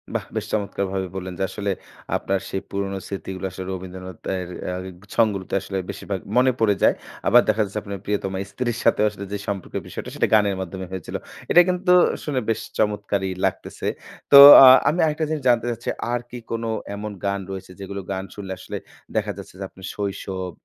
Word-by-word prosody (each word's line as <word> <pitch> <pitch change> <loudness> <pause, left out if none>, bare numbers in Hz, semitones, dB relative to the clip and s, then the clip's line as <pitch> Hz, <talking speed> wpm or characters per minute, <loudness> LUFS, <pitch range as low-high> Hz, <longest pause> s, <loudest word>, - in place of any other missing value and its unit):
বাহ! - - -1
বেশ - - -2
চমৎকারভাবে 95 -2 -1
বললেন 95 -1 -5
যে - - +1
আসলে, 100 0 -2 0.5
আপনার 95 0 -1
সেই 95 - -3
পুরনো 100 0 -3
স্মৃতিগুলো 95 0 -5
আসলে 95 0 -7
রবীন্দ্রনাথের 95 0 -6 0.2
অ্যা 90 0 -3 0.4
সং 115 - +5
গুলোতে 95 -1 -4
আসলে 95 - -4
বেশিরভাগ 100 -2 -4 0.2
মনে 130 +1 +5
পড়ে 105 -3 +3
যায়। - - +5 0.3
আবার 120 +1 +7
দেখা 110 +1 +2
যাচ্ছে 105 +2 -4
আপনার 100 -1 -6
প্রিয়তমা 95 -2 -2
স্ত্রীর 120 +2 -2
সাথেও 105 - +4
আসলে 100 -1 -8
যে 100 - -1
সম্পর্কের 100 -3 -3
বিষয়টা, - - -6
সেটা - - +2
গানের 105 -2 +4
মাধ্যমে 95 +1 -5
হয়েছিল। 95 -3 -6 0.4
এটা 175 - +9
কিন্তু 180 0 +2 0.3
শুনে 145 -4 -1
বেশ 110 - +1 0.2
চমৎকারই 100 -2 0
লাগতেছে। - - -3 0.4
তো 140 - +10 0.3
আ - - +10 0.2
আমি 175 - -1
আরেকটা 155 0 0
জিনিস 155 -4 -2
জানতে 120 0 +3
চাচ্ছি, 115 - -5 0.2
আর 120 0 0
কি 125 - -7
কোন 115 0 -2 0.3
এমন 105 +1 -5
গান 100 0 0
রয়েছে, 95 -1 -7
যেগুলো 100 0 -5
গান 95 0 -2
শুনলে 95 -2 -7
আসলে - - -6 0.4
দেখা - - 0
যাচ্ছে - - -10
যে, - - -4
আপনার 95 - -12
শৈশব, 95 -2 -4
100 Hz, 185 wpm, -23 LUFS, 95-110 Hz, 0.5 s, তো